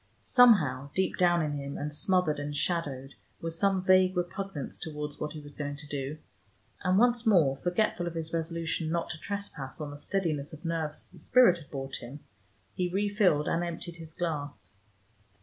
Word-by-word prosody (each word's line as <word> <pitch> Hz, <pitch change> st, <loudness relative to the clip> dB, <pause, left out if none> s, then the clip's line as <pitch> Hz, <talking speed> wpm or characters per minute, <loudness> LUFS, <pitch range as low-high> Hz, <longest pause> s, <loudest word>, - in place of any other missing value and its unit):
Somehow 185 Hz, -, +5 dB
deep 190 Hz, 0 st, +1 dB
down 175 Hz, -2 st, +4 dB
in 150 Hz, -, -1 dB
him, 140 Hz, 0 st, -5 dB
and 150 Hz, +1 st, -4 dB
smothered 180 Hz, -1 st, +1 dB
and 145 Hz, 0 st, -3 dB
shadowed, 140 Hz, -6 st, -2 dB, 0.3 s
was 165 Hz, 0 st, -4 dB
some 195 Hz, -2 st, +2 dB
vague 185 Hz, 0 st, +5 dB
repugnance 175 Hz, -3 st, -3 dB
towards 150 Hz, -2 st, -5 dB
what 150 Hz, -, -3 dB
he 155 Hz, -, -7 dB
was 145 Hz, -1 st, -12 dB
going 145 Hz, 0 st, -4 dB
to 145 Hz, +1 st, -11 dB
do, 145 Hz, 0 st, -4 dB, 0.7 s
and 185 Hz, +1 st, +3 dB
once 240 Hz, +1 st, +4 dB
more, 160 Hz, -10 st, +5 dB
forgetful 175 Hz, +1 st, 0 dB
of 170 Hz, -, -5 dB
his 165 Hz, 0 st, -4 dB
resolution 165 Hz, 0 st, -2 dB
not 170 Hz, +1 st, -1 dB
to 160 Hz, -, -7 dB
trespass 185 Hz, -10 st, -5 dB
on 150 Hz, -2 st, -4 dB
the 145 Hz, -, -9 dB
steadiness 155 Hz, -6 st, -1 dB
of 155 Hz, +3 st, -11 dB
nerves 160 Hz, -2 st, -2 dB
the -, -, -14 dB
spirit 180 Hz, -, +4 dB
brought 135 Hz, -1 st, -4 dB
him, 135 Hz, +5 st, -9 dB, 0.5 s
he 180 Hz, -1 st, -1 dB
refilled 195 Hz, -5 st, +2 dB
and 170 Hz, -, +1 dB
emptied 170 Hz, 0 st, -5 dB
his 160 Hz, -1 st, -10 dB
glass. 155 Hz, -4 st, -4 dB
165 Hz, 175 wpm, -29 LUFS, 145-185 Hz, 0.7 s, Somehow